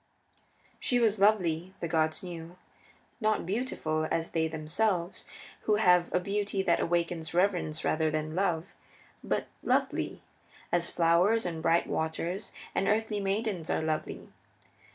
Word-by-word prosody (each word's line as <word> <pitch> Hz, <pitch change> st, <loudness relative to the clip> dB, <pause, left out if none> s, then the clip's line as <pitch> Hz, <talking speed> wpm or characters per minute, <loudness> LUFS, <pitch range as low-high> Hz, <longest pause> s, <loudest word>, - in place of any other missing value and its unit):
She 245 Hz, -, +1 dB
was 220 Hz, -3 st, +3 dB
lovely, 185 Hz, -3 st, +2 dB
the 170 Hz, -, -2 dB
gods 160 Hz, 0 st, 0 dB
knew; 170 Hz, -1 st, -8 dB, 0.6 s
not 215 Hz, -4 st, +1 dB
beautiful 170 Hz, -7 st, -1 dB
as 165 Hz, 0 st, -1 dB
they 160 Hz, -1 st, +1 dB
themselves 170 Hz, +4 st, -1 dB
are, -, -, -17 dB
who 215 Hz, -, +4 dB
have 180 Hz, -4 st, +4 dB
a -, -, +2 dB
beauty 200 Hz, +1 st, -1 dB
that 170 Hz, -3 st, +3 dB
awakens 170 Hz, -1 st, -1 dB
reverence 175 Hz, -4 st, +1 dB
rather 155 Hz, 0 st, +2 dB
than 155 Hz, 0 st, -2 dB
love, 175 Hz, -1 st, 0 dB, 0.5 s
but -, -, -1 dB, 0.2 s
lovely, -, -, 0 dB, 0.5 s
as 170 Hz, 0 st, +1 dB
flowers 175 Hz, +7 st, +3 dB
and 165 Hz, -2 st, -3 dB
bright 165 Hz, +1 st, +3 dB
waters 170 Hz, +5 st, -2 dB, 0.2 s
and 195 Hz, -, 0 dB
earthly 215 Hz, 0 st, +1 dB
maidens 195 Hz, -3 st, -1 dB
are -, -, 0 dB
lovely. 155 Hz, -1 st, -3 dB
175 Hz, 135 wpm, -30 LUFS, 160-200 Hz, 0.6 s, who